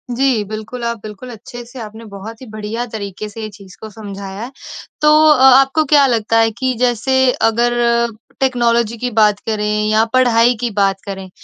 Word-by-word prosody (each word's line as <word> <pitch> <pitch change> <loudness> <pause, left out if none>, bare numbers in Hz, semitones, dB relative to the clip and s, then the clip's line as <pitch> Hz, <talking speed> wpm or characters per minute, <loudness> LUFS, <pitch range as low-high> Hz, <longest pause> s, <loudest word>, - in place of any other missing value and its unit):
जी, 255 -4 +1
बिल्कुल 220 +3 -6
आप 235 0 -2
बिल्कुल 215 +4 -9
अच्छे 240 +2 -10
से 245 +2 -12
आपने 220 0 -9
बहुत 215 +4 -9
ही - - -9
बढ़िया 215 +2 -5
तरीके 205 -1 -6
से 225 +2 -9
ये 215 - -5
चीज़ 200 -2 -15
को 220 - -8
समझाया 200 -1 -8
है। 245 - -7 0.5
तो 300 - +5 0.2
अ, 295 - +3
आपको 270 +4 +5
क्या 285 -1 +5
लगता 225 -2 +1
है 225 0 +3
कि 255 +3 -2
जैसे 255 +2 +2 0.2
अगर 235 +2 +1 0.7
टेक्नोलॉजी 235 -3 +1
की 250 +2 -3
बात 210 -2 +3
करें 215 -1 -1 0.2
या 215 +1 +3
पढ़ाई 245 -2 +4
की 240 - 0
बात 195 -1 0
करें 195 -2 -7
225 Hz, 185 wpm, -17 LUFS, 210-250 Hz, 0.7 s, तो